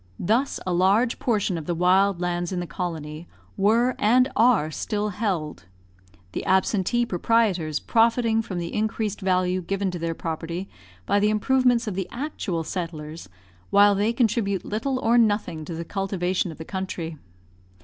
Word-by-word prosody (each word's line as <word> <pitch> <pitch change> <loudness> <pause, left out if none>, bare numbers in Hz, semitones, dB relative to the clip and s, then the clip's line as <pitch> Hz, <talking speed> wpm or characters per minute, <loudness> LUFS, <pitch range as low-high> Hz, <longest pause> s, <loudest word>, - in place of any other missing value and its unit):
Thus 235 +9 0
a 185 - -1
large 200 +7 +2
portion 205 -7 0
of 155 - -9
the 175 - -1
wild 185 +2 +3
lands 175 0 -2
in 185 - -2
the 175 - -3
colony 160 -2 -5 0.3
were 230 +6 +3
and 250 +5 +4
are 220 -10 +3
still 210 +6 -2
held: 180 - -3 0.7
the - - -4
absentee 190 +5 +2
proprietors 185 -6 +1
profiting 230 0 +2
from 200 -5 -6
the 170 -1 -4
increased 215 -1 -2
value 185 -1 +1
given 195 +1 -2
to 175 - -5
their 165 0 -2
property 170 +3 -4 0.4
by 200 - +2
the 210 +1 +3
improvements 250 +2 +2
of 210 - -3
the 190 -1 -3
actual 235 - -3
settlers, 160 - -6 0.4
while 205 0 +6
they 205 +3 +1
contribute 225 -5 0
little 245 +6 -2
or 240 -1 +3
nothing 205 -8 +1
to 170 - -6
the 165 +1 -5
cultivation 185 -2 -1
of 155 - -11
the 160 - -8
country. 175 -5 -5
195 Hz, 160 wpm, -24 LUFS, 175-225 Hz, 0.7 s, while